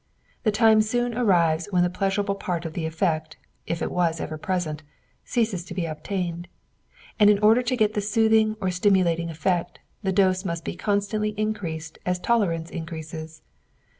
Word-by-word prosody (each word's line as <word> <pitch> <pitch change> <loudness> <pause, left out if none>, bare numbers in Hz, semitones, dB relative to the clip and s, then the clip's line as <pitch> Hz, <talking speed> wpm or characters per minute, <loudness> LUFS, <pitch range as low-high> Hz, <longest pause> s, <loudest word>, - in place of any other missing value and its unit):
The 215 - +2
time 220 0 +5
soon 240 +2 0
arrives 175 -8 +2
when 180 -3 +3
the 175 - +2
pleasurable 200 +1 0
part 175 -3 -3
of 160 - -5
the 160 -1 -2
effect 160 -1 -1 0.3
if 165 - -2
it - - -2
was 170 -2 +1
ever 155 - -4
present 160 -3 -2 0.4
ceases 220 -7 -1
to 180 - -8
be 180 -2 -1
obtained; 175 +1 -4 0.7
and 210 -1 +7
in 210 - +5
order 215 +4 +5
to 250 +1 -1
get 215 -2 +2
the 210 - 0
soothing 220 0 +3
or 190 -3 0
stimulating 180 -3 +2
effect, 175 +2 -1 0.2
the 195 -2 0
dose 185 -1 +2
must 170 -3 -4
be - - -4
constantly 210 +2 -1
increased 170 -7 -3
as 180 0 0
tolerance 175 -7 0
increases. 160 -1 -7
185 Hz, 165 wpm, -25 LUFS, 165-210 Hz, 0.7 s, and